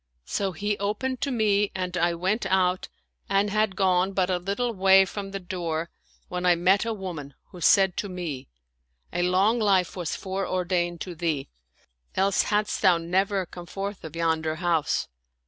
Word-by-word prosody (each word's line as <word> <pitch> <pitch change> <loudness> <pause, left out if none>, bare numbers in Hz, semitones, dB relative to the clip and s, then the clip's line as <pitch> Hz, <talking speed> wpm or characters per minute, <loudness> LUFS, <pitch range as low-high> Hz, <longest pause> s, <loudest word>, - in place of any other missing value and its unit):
So 195 - -1
he 205 +4 -2
opened 225 +6 -2
to 280 - 0
me 210 -4 +2
and 180 -1 -3
I 170 -1 +1
went 190 +7 0
out 185 -1 +1 0.4
and 195 +1 +2
had 215 -2 +1
gone 190 0 +2
but 185 -1 +1
a 180 - +2
little 200 +6 -2
way 190 -1 +6
from 195 +1 -6
the 195 0 -5
door 170 -3 -3 0.4
when 180 0 -4
I 180 -1 +5
met 185 +5 +3
a 230 - -1
woman, 175 -9 -6 0.2
who 180 -3 -11
said 190 +2 +5
to 205 - -2
me, 170 -8 -5 0.3
" 60 0 -39
A - - 0
long 190 +6 +3
life 195 -5 +2
was 175 -4 -3
fore 190 0 -3
ordained 175 -2 -1
to 180 - -5
thee; 160 -5 -2 0.7
else 195 0 +3
hadst 210 0 0
thou 185 -4 +5
never 190 +3 0
come 175 0 -10
forth 200 +2 -5
of 160 -1 -8
yonder 160 -1 0
house." 170 -2 0
185 Hz, 180 wpm, -26 LUFS, 175-200 Hz, 0.7 s, way